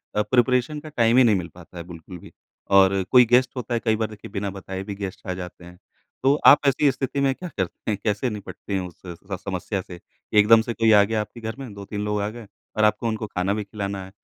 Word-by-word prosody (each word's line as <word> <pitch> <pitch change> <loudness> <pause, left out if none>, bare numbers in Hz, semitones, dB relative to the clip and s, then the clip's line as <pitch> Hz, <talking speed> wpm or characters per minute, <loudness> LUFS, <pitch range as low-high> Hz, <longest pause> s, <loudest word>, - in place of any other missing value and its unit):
अ, 105 - +3
preparation 125 +6 +1
का 155 +1 -10
time 120 -4 +2
ही 130 - +7
नहीं 110 -4 +4
मिल 90 -3 -3
पाता 90 0 -14
है 85 - -5
बिल्कुल 85 +1 -10
भी - - -14 0.5
और 95 0 +4
कोई 125 -1 +8
गेस्ट 125 +2 +4
होता 125 -1 -4
है। 120 - +1
कई 110 -1 +3
बार 110 0 -1
देखिए 105 -2 -11
बिना 100 -1 -3
बताए 95 0 -6
भी 100 0 -6
गेस्ट 100 -2 -7
आ 90 - 0
जाते 90 -1 -9
हैं, 90 0 -13 0.5
तो 135 +1 +5
आप 145 - +9
ऐसी 140 +1 +3
स्थिति 135 +2 -3
में 135 -1 +2
क्या 180 +3 -7
करते 95 +3 -3
हैं? 105 - -1
कैसे 105 +4 0
निपटते 105 -1 -7
हैं 95 - 0
उससे 90 0 -11 0.2
स - - -11
समस्या 95 +1 -3
से? 90 -2 -11 0.3
एकदम 110 +2 +6
से 120 - -4
कोई 115 -1 +3
आ 105 -1 +7
गया 110 +1 -1
आपके 115 +3 -9
घर 110 0 -5
में 125 -6 -8
2-3 100 +1 -6
लोग 105 0 -1
आ 100 - -1
गए 115 -1 -10 0.3
और 110 - +3
आपको 105 +2 +2
उनको 110 -1 -3
खाना 95 +1 -1
भी 105 0 -2
खिलाना 100 -1 -5
है - - -12
105 Hz, 255 wpm, -23 LUFS, 95-120 Hz, 0.5 s, आप